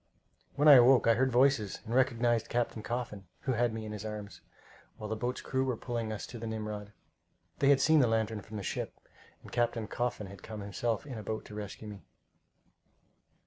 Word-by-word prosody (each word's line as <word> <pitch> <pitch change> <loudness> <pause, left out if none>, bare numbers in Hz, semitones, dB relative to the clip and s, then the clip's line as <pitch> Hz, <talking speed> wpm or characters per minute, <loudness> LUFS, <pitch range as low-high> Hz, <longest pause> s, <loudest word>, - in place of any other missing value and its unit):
When 145 +2 +3
I 145 -3 +11
awoke 125 +1 +6
I 115 - +6
heard 130 +3 +2
voices 125 -5 +3
and 115 - -4
recognized 120 -3 +2
Captain 120 -2 -1
Coffin, 105 -5 -4
who 135 - -1
had 120 -1 +2
me 110 0 -5
in 105 - -6
his 105 -1 -6
arms, 105 -2 -7 0.6
while 110 - -6
the 110 - -2
boat's 125 +3 -3
crew 130 0 -1
were 130 -3 -1
pulling 115 -2 -3
us 105 - -4
to 120 - -9
the 115 - -5
Nimrod. 105 -2 -5 0.7
They 140 - +4
had 140 -1 +6
seen 160 +1 +5
the 125 - +5
lantern 110 -1 0
from 110 +1 -8
the 100 - -5
ship, - - -4 0.5
and - - -12
Captain 120 -2 0
Coffin 120 -1 -2
had 100 +1 -11
come 110 -1 -7
himself 110 +5 -2
in 130 -5 -7
the - - -5
boat 110 +1 -4
to - - -11
rescue 105 +1 -7
me. 105 -2 -8
115 Hz, 205 wpm, -31 LUFS, 105-125 Hz, 0.7 s, I